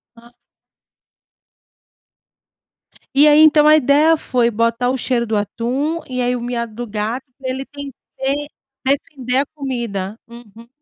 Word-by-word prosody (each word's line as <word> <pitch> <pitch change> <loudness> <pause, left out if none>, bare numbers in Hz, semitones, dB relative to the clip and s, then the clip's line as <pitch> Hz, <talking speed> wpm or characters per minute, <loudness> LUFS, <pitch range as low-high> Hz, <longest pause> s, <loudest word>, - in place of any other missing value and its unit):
Hã. 235 +1 -18 2.8
E 290 +2 +7
aí, 300 0 +6
então, 305 -1 +6
a 305 - +8
ideia 300 +3 +4
foi 245 -5 +1
botar 230 +2 0
o 265 - 0
cheiro 240 -1 0
do 220 -1 -2
atum, 250 - -2
e 255 -1 -2
aí 245 0 +1
o 245 - -5
miado 235 -2 -4
do 240 +1 -5
gato 220 +5 -3 0.2
ele 260 +1 -3
tem 285 -1 -9
que 275 +3 -4 0.4
defender 265 -2 -1
a 280 - +1
comida? 235 -9 -5
Uhum. 235 -1 -14
250 Hz, 140 wpm, -19 LUFS, 235-285 Hz, 2.8 s, a